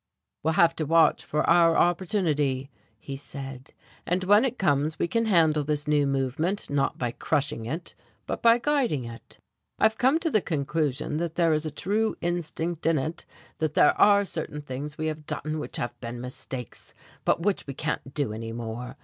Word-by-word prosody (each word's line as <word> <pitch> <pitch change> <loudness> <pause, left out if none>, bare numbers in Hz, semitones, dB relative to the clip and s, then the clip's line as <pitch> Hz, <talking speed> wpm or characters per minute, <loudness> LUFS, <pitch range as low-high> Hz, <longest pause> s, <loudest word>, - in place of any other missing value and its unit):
"We'll 160 +1 0
have 170 -1 +5
to 155 - -1
watch 165 +1 +4
for 150 0 -1
our 165 -1 +5
opportunity," 155 -7 +1 0.3
he 135 +5 -7
said, 135 -1 -8 0.3
"and 180 +2 0
when 205 +4 +5
it 255 -1 -2
comes 150 -3 +1
we - - 0
can 230 +6 0
handle 160 -7 +3
this 150 0 -1
new 145 -1 +3
movement 140 +9 -1
not 140 -1 0
by 125 -2 -1
crushing 145 -3 -1
it, 160 +8 -4 0.3
but - - -4
by 230 0 +6
guiding 245 - +1
it. 115 0 -11 0.4
I've 220 0 +2
come 265 +5 +4
to 325 - 0
the 215 - +3
conclusion 150 -2 -1
that 170 0 -3
there 165 -2 +3
is 155 +1 0
a - - -4
true 215 +8 0
instinct 170 -1 -2
in 165 -1 +3
it, 155 +5 -2 0.3
that 155 -2 -1
there - - +6
are 200 0 +6
certain 150 -4 -5
things 145 +2 -6
we 155 - -2
have 155 -1 -4
done 155 0 -3
which 150 - -6
have 120 - -3
been 120 0 -6
mistakes, 125 0 -6 0.3
and 170 - +2
which 205 -6 0
we 140 - -6
can't 140 -2 -3
do 140 -8 0
any 115 +1 -5
more. 120 +1 -6
155 Hz, 185 wpm, -26 LUFS, 140-175 Hz, 0.4 s, by